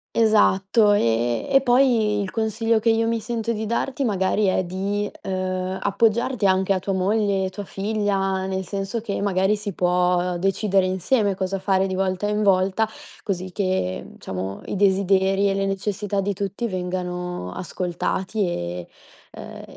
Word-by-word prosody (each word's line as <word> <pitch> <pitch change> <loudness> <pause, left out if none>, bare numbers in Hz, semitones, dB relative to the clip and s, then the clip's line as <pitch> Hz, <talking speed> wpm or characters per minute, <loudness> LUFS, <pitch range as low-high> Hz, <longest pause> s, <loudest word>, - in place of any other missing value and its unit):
Esatto. 210 -1 +4
Ehm, 120 - +1
e 270 -1 +6
poi 240 -5 +3
il 195 - -3
consiglio 225 +1 0
che 225 +1 +3
io 225 0 +2
mi 230 0 0
sento 230 +1 -3
di 220 -1 -2
darti, 255 +5 -1
magari, 200 -1 +1
è 185 0 +2
di, 200 +3 -2
ehm, 185 0 -2
appoggiarti 225 +3 +1
anche 190 0 +3
a 190 - +3
tua 195 +1 -2
moglie, 195 0 +1
tua 205 +2 -7
figlia, 195 -2 -1
nel 190 0 -2
senso 195 +4 -3
che, 205 -3 -3
magari, 195 +1 +2
si 205 -2 -5
può 180 0 +1
decidere 195 +1 +1
insieme 195 +3 +1
cosa 190 +1 -2
fare 190 0 +1
di 190 - -3
volta 190 +1 -1
in 210 0 0
volta, 195 +2 +3 0.4
così 185 -2 -3
che, 185 - -2
diciamo, 95 +1 -5
i - - -4
desideri 195 0 +3
e 195 - 0
le 195 0 0
necessità 200 +1 -2
di 200 +1 -1
tutti 200 +4 -3
vengano 180 - -4
ascoltati 185 - -2
e 90 - -4 0.4
ehm, - - -10
195 Hz, 155 wpm, -23 LUFS, 185-210 Hz, 0.4 s, e